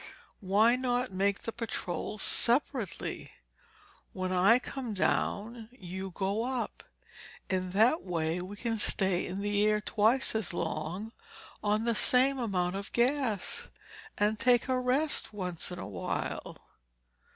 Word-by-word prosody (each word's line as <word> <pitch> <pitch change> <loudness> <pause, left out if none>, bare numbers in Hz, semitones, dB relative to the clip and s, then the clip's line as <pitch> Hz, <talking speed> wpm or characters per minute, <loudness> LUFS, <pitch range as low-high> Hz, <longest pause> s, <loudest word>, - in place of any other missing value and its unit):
"Why 215 +4 +4
not 250 -1 0
make 195 +1 0
the 230 - -3
patrols 215 -3 -4
separately? 240 - 0 0.8
When 185 0 -3
I 185 +6 +5
come 250 -3 -5
down, 220 +4 -1
you 190 -5 -7
go 195 +4 -1
up. 250 -1 -3 0.7
In 185 -1 0
that 230 - +4
way 165 -1 -1
we 190 +3 -7
can 225 +1 -2
stay 190 -3 +2
in 190 +2 -4
the 205 0 +1
air 210 0 +3
twice 225 +5 +3
as 220 -5 -2
long 175 +10 -3 0.5
on 210 +2 +1
the 235 - +2
same 260 +4 +3
amount 190 -5 -1
of 200 +1 -7
gas, 240 -5 +1 0.5
and 210 +1 +1
take 245 0 +4
a 255 -1 +1
rest 260 +1 0
once 180 -4 -3
in 180 - -6
a - - -6
while." 95 -4 -4
210 Hz, 135 wpm, -30 LUFS, 190-240 Hz, 0.8 s, I